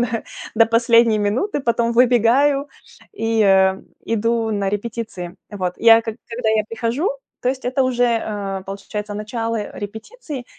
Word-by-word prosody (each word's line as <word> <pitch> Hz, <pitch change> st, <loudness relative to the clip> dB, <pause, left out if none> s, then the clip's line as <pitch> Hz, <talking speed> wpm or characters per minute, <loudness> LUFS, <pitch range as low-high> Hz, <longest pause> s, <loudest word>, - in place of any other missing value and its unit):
на 240 Hz, -1 st, -1 dB
на 230 Hz, -, -2 dB, 0.3 s
до 225 Hz, 0 st, +5 dB
последней 230 Hz, -1 st, +4 dB
минуты, 245 Hz, -, 0 dB
потом 235 Hz, -2 st, +1 dB
выбегаю 250 Hz, +4 st, +4 dB, 0.5 s
и, 225 Hz, -, 0 dB
э, 190 Hz, -1 st, +4 dB, 0.3 s
иду 230 Hz, 0 st, 0 dB
на 200 Hz, -2 st, -1 dB
репетиции. 205 Hz, -4 st, -4 dB, 0.2 s
Вот, 185 Hz, -4 st, -3 dB
я 230 Hz, 0 st, +7 dB
к -, -, -31 dB
когда 230 Hz, +1 st, -4 dB
я 215 Hz, -1 st, +2 dB
прихожу, 235 Hz, -, -1 dB, 0.3 s
то -, -, +1 dB
есть 260 Hz, 0 st, -6 dB
это 255 Hz, +2 st, +1 dB
уже, 250 Hz, -1 st, +1 dB
э, 205 Hz, -5 st, -2 dB
получается, 205 Hz, +1 st, -6 dB
начало 225 Hz, +2 st, -3 dB, 0.2 s
репетиции, 250 Hz, -, -7 dB
230 Hz, 145 wpm, -20 LUFS, 210-240 Hz, 0.5 s, я